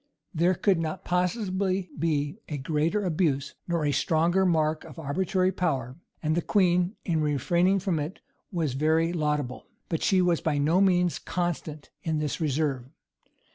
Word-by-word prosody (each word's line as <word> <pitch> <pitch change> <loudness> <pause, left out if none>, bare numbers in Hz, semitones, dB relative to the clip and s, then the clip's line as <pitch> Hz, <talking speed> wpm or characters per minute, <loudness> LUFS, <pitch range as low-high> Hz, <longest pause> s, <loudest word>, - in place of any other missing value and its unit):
[v] 160 - -6
There 180 +2 +4
could 190 -3 +2
not 165 +2 -4
possibly 185 0 0
be 150 +3 -1
a 150 - -3
greater 160 +8 0
abuse, 155 -5 0
nor 170 -3 0
a 145 - +2
stronger 170 +6 +2
mark 155 -2 +1
of - - -12
arbitrary 185 +5 0
power; 135 -10 -1 0.3
and 155 0 +1
the 170 - +1
queen, 180 +1 +2
in 165 -3 +1
refraining 170 +6 +2
from 185 -4 -1
it, 150 +6 -5 0.3
was 165 -8 -1
very 160 +4 +2
laudable. 150 -5 -2 0.2
But 165 - -1
she 190 - +3
was 175 -2 +2
by 155 -3 0
no 160 +6 +3
means 180 -3 +3
constant 170 -4 -4
in 160 -1 -1
this 150 +1 -2
reserve. 140 -4 0
165 Hz, 160 wpm, -27 LUFS, 150-180 Hz, 0.3 s, There